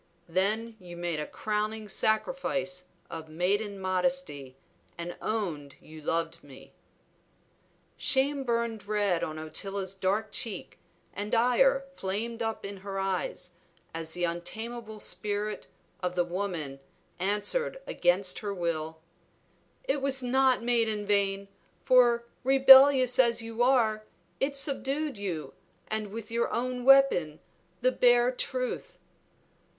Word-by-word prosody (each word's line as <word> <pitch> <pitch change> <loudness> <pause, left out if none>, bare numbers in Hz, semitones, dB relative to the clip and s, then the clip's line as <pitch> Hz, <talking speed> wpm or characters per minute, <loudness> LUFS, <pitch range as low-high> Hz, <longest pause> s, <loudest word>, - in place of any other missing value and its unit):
Then 215 +6 0
you 175 -2 -10
made 170 -2 -2
a 150 - -4
crowning 215 0 -2
sacrifice 185 -5 0 0.2
of 160 -1 -7
maiden 200 +5 -1
modesty 185 - -1 0.4
and 170 +1 -5
owned 170 -11 -3
you 155 0 -13
loved 165 +2 -1
me." 140 -2 -14 1.2
Shame 275 +1 +1
burned 230 -4 -2
red 205 -5 +1
on 155 0 -4
Ottila's 190 +5 -3
dark 195 +3 -1
cheek, 210 -6 -5 0.3
and 210 +4 -2
ire 260 +3 +3
flamed 225 +4 -3
up 225 -2 -3
in 200 0 -6
her 195 0 -6
eyes, 185 -2 -2 0.4
as 160 0 -4
the 175 - -2
untamable 220 +6 -4
spirit 210 0 -3 0.3
of 180 -1 -2
the 175 -1 +2
woman 175 -7 -4 0.4
answered 210 - 0
against 180 +1 +2
her 205 -2 -4
will 160 -2 -3 0.8
"It 275 +1 -1
was 270 -1 -1
not 260 -1 +3
made 235 -2 +2
in 210 -1 -3
vain; 200 -1 +1 0.4
for, 240 -2 +4 0.2
rebellious 265 -1 +7
as 235 -2 +4
you 225 +1 -4
are, 225 -4 +2 0.3
it 280 +1 0
subdued 275 -1 -1
you, 165 -9 -4 0.4
and 215 -1 -2
with 220 +1 -8
your 235 0 0
own 250 0 -2
weapon, 270 - +5 0.4
the 255 +1 +3
bare 245 0 +4
truth." 255 - -3
210 Hz, 125 wpm, -29 LUFS, 180-245 Hz, 1.2 s, rebellious